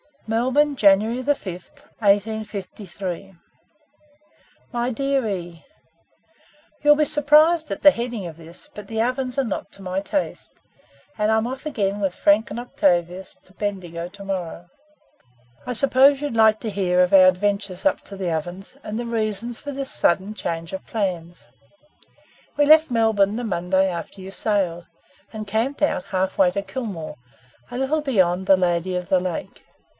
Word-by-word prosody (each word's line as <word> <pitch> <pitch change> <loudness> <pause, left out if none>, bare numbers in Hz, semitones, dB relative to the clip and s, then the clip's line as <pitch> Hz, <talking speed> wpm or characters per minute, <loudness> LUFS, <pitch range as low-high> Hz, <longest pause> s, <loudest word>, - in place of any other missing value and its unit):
"Melbourne, 260 +6 +1
January 215 +4 +4
5, 285 +3 +2 0.7
1853. 200 -3 -2 1.4
"My 240 0 -1
dear 275 0 0
E, 175 -4 -6 1.2
"You'll 295 0 +6
be 300 - +2
surprised 305 +2 +4
at 195 - -4
the 290 - +9
heading 235 -5 -4
of 165 -2 -8
this 170 - -11
but 210 -5 -10
the 225 +1 -2
Ovens 255 +1 -2
are 275 - +2
not 225 -6 -4
to 200 - -9
my 185 0 -2
taste, 280 +8 -4 0.6
and 210 0 +1
I'm 220 0 +2
off 260 +4 -6
again 205 -9 -1
with 195 -3 -1
Frank 205 +2 +3
and 230 +4 -5
Octavius 180 -5 0
to 185 - -22
Bendigo 180 -5 -4
tomorrow. 185 -3 -6 1.0
I 250 - -1
suppose 275 +2 +5
you'll 290 - -2
like 220 -1 +4
to 225 - -3
hear 180 -2 +1
of 180 +1 +2
our 185 -1 +8
adventures 200 +1 0
up 290 - +2
to 200 - -10
the 185 -3 -3
Ovens, 175 - -5
and 210 +1 -5
the 240 - -3
reasons 225 0 -3
for 285 - -6
this 275 0 -5
sudden 190 +4 +1
change 165 -5 -4
of 190 0 -7
plans. 175 -5 -4 1.1
We 290 0 +3
left 310 +1 +6
Melbourne 220 -4 +2
the 245 - -3
Monday 190 -2 +1
after 180 +2 -6
you 190 +1 -8
sailed, 185 -5 -1 0.5
and 215 -1 -6
camped 225 +8 -2
out 290 - +1
half 190 0 -2
way 190 -2 +6
to 200 - -2
Kilmore, 200 - -6 0.5
a - - -6
little 275 +4 0
beyond 190 -9 +1
the 195 - +6
'Lady 180 0 0
of 180 0 -4
the 190 -2 +4
Lake.' 180 -2 -5
205 Hz, 160 wpm, -22 LUFS, 185-245 Hz, 1.4 s, the